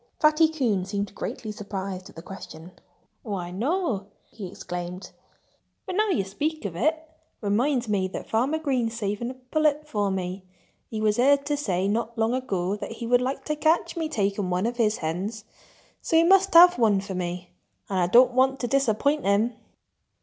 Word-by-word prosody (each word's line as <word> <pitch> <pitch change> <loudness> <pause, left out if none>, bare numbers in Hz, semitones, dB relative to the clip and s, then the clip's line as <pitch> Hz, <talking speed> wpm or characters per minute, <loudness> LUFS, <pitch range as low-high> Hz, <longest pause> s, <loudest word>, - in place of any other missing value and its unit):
Fatty 310 +1 +5
Coon 240 -12 0
seemed 200 +1 -3
greatly 215 +1 -5
surprised 195 -3 -6
at - - -17
the 165 - -10
question. 180 -3 -10 0.5
"Why—no!" 205 - -2 0.2
he 205 -4 -7
exclaimed. 180 0 -7 0.7
"But - - -4
now 430 +2 +2
that 380 - +1
you 195 - +1
speak 290 +10 -3
of 180 -4 -4
it, 310 - +2
it 320 0 -21 0.3
reminds 240 +5 +1
me 200 -3 +1
that 185 - -7
Farmer 255 +8 +1
Green's 255 -7 -1
saving 210 +2 -2
a 260 - -7
pullet 300 +3 0
for 205 -7 0
me. 185 0 -3 0.5
He 220 - -4
was 215 -1 +2
heard 280 +3 +4
to 295 0 0
say 195 -10 -1
not 230 +3 -2
long 225 +1 +1
ago 200 -7 -1
that 220 - -6
he 230 - -6
would 245 +1 +3
like 265 +1 -3
to 305 - -1
catch 315 +3 +1
me 325 -2 -2
taking 200 -5 -1
one 180 +3 0
of 240 +1 -2
his 220 -2 +2
hens. 195 +7 -4 0.6
So 325 - +2
he 330 - +6
must 385 +2 +5
have 350 -3 +9
one 215 -4 +4
for 195 0 -6
me. 180 0 -4 0.4
And 190 -2 -1
I 175 - +2
don't 245 +6 +6
want 265 +1 +3
to 245 - -1
disappoint 275 +3 +1
him." 205 +4 +2
225 Hz, 185 wpm, -25 LUFS, 195-280 Hz, 0.7 s, have